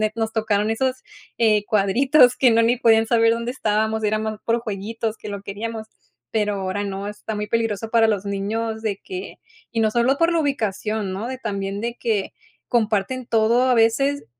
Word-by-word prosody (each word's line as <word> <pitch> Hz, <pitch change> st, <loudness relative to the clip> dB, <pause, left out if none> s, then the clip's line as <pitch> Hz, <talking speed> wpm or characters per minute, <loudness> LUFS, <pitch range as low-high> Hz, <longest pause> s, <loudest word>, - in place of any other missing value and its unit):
nos 225 Hz, -1 st, -2 dB
tocaron 215 Hz, -1 st, 0 dB
esos, 260 Hz, +3 st, -1 dB, 0.3 s
eh, 215 Hz, -3 st, +3 dB
cuadritos 245 Hz, +6 st, +4 dB
que 250 Hz, -3 st, +5 dB
no 230 Hz, 0 st, +4 dB
ni 240 Hz, +2 st, +2 dB
podían 225 Hz, -2 st, +4 dB
saber 230 Hz, 0 st, +4 dB
dónde 235 Hz, +1 st, -3 dB
estábamos, 220 Hz, -2 st, 0 dB
era 215 Hz, +1 st, +1 dB
más 215 Hz, -1 st, -4 dB
por 235 Hz, +1 st, +1 dB
jueguitos 220 Hz, +1 st, -4 dB
que -, -, -8 dB
lo 200 Hz, -1 st, -5 dB
queríamos, 220 Hz, +2 st, -5 dB, 0.4 s
pero 210 Hz, -2 st, 0 dB
ahora 195 Hz, +1 st, -3 dB
no, 195 Hz, 0 st, -4 dB
está 210 Hz, +1 st, -6 dB
muy 210 Hz, 0 st, -3 dB
peligroso 225 Hz, -1 st, -1 dB
para 230 Hz, -1 st, +4 dB
los 205 Hz, -3 st, -1 dB
niños 220 Hz, +3 st, -3 dB
de 205 Hz, -3 st, -1 dB
que 375 Hz, 0 st, -7 dB, 0.3 s
y 230 Hz, -, -2 dB
no 220 Hz, -, +3 dB
solo 240 Hz, +4 st, +2 dB
por 335 Hz, +1 st, +3 dB
la 335 Hz, -, +2 dB
ubicación, 215 Hz, -7 st, -2 dB
¿no? 205 Hz, +5 st, -4 dB
De 260 Hz, 0 st, -5 dB
también, 200 Hz, -4 st, -3 dB
de 235 Hz, +1 st, -3 dB
que 215 Hz, -5 st, -1 dB, 0.4 s
comparten 230 Hz, +2 st, 0 dB
todo 230 Hz, +3 st, +3 dB
a 250 Hz, -, +5 dB
veces 275 Hz, +5 st, +2 dB
220 Hz, 190 wpm, -22 LUFS, 210-235 Hz, 0.4 s, que